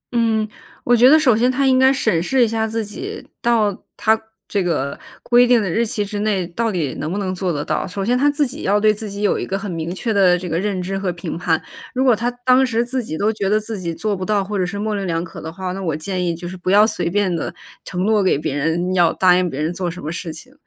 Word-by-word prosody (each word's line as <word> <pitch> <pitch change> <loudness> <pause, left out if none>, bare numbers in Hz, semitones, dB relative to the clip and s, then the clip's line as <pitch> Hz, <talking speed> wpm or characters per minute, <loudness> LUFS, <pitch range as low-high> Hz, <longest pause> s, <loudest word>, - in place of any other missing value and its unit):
嗯， 220 -2 +2 0.4
我 245 - +4
觉 245 +2 +7
得 310 - +8
首 260 -7 +4
先 245 +3 +3
他 275 +2 +1
应 260 -1 +4
该 265 0 +6
审 220 -11 +1
视 250 +8 +2
一 - - -1
下 220 0 -1
自 225 0 -2
己， 390 - -7
到， 220 -4 +1
他， 220 0 +2 0.3
这 200 - 0
个， 140 -5 -2 0.2
规 245 +1 +5
定 245 -1 +5
的 200 -5 -1
日 225 +7 +1
期 215 -3 -2
之 205 0 -5
内 205 -3 0
到 225 +7 -2
底 165 -8 -2
能 155 +2 -3
不 195 - -2
能 190 -2 -2
做 185 -1 -2
得 145 -2 -3
到。 - - -1
首 195 +1 -4
先 245 +3 +2
他 280 +3 +3
自 290 0 +1
己 245 - -7
要 205 +2 +2
对 215 0 +4
自 210 0 -6
己 200 +1 -5
有 205 - +2
一 - - -4
个 195 - -1
很 200 -1 -5
明 165 0 -4
确 225 +3 -2
的 185 -3 +4
这 180 0 -6
个 165 0 -1
认 200 -1 -1
知 195 +2 -3
和 190 -2 -1
评 170 -1 -6
判， 165 -1 +1 0.4
如 260 - +2
果 250 -3 +5
他 235 +3 -1 0.2
当 255 +1 +5
时 235 -2 +1
自 255 +1 -2
己 155 -8 -5
都 215 +5 +1
觉 200 -3 -2
得 210 +1 +3
自 215 -1 -6
己 170 -2 -3
做 210 +2 -1
不 185 - -5
到， 205 +1 +1
或 200 +1 -3
者 180 - +1
是 200 +3 -5
模 215 +1 -2
棱 200 -2 -2
两 165 -1 -1
可 165 - -9
的 160 - -6
话， 185 +2 -5
那 195 +2 -5
我 165 -5 -1
建 180 +3 -3
议 170 -1 -1
就 175 +1 -7
是 185 - -7
不 180 - -4
要 205 +2 +6
随 180 -6 -1
便 190 -1 +1
地 165 - -4 0.3
承 180 -1 -3
诺 215 -1 +3
给 190 -7 +2
别 140 -1 -3
人， 165 +5 0
要 175 -2 +4
答 180 -1 +4
应 180 0 +1
别 135 - -6
人 160 +3 -1
做 180 0 -2
什 175 +2 -8
么 155 - -3
事 165 0 -5
情。 255 +12 -12
200 Hz, 310 characters per minute, -20 LUFS, 175-225 Hz, 0.4 s, 得